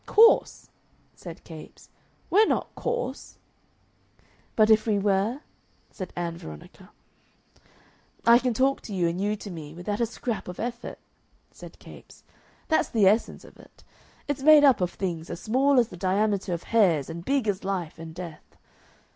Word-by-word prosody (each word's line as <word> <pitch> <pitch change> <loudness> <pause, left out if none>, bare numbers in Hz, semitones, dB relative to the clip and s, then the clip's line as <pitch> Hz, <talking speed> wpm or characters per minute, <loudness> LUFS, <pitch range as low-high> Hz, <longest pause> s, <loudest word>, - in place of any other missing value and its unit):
"Coarse?" 455 +2 +4 0.4
said 170 -1 -11
Capes, 160 -2 -13 0.4
"We're 420 +4 +5
not - - -1
coarse." 485 +1 -4 1.2
"But 215 0 +4
if 215 +1 +4
we 210 -2 +2
were?" 200 +6 0 0.5
said 185 -3 -7
Ann 170 -1 -4
Veronica. 75 -1 -12 1.4
"I 235 +1 +7
can 250 -3 -1
talk 270 +3 +1
to 205 - -7
you 175 -2 +1
and 170 +3 -3
you 205 +1 0
to 205 -1 -9
me 155 -2 -9
without 205 +5 -4
a 235 - +2
scrap 235 -1 -5
of 180 - -8
effort," 235 0 -5 0.5
said - - -13
Capes; - - -15 0.4
"that's 315 - +1
the 215 -4 +2
essence 210 +4 +2
of - - -17
it. - - -19 0.4
It's 290 -2 -3
made 305 +1 +7
up 270 -8 +5
of 180 - +1
things 175 -4 -5
as - - -6
small 260 +5 +2
as 235 - +1
the 180 - -10
diameter 195 +1 0
of 170 -1 -3
hairs 175 -11 +3
and 170 +1 -7
big 270 0 0
as 200 -2 -1
life 180 -5 -4
and 160 -1 -9
death.... 170 -3 -10
205 Hz, 165 wpm, -26 LUFS, 175-240 Hz, 1.4 s, I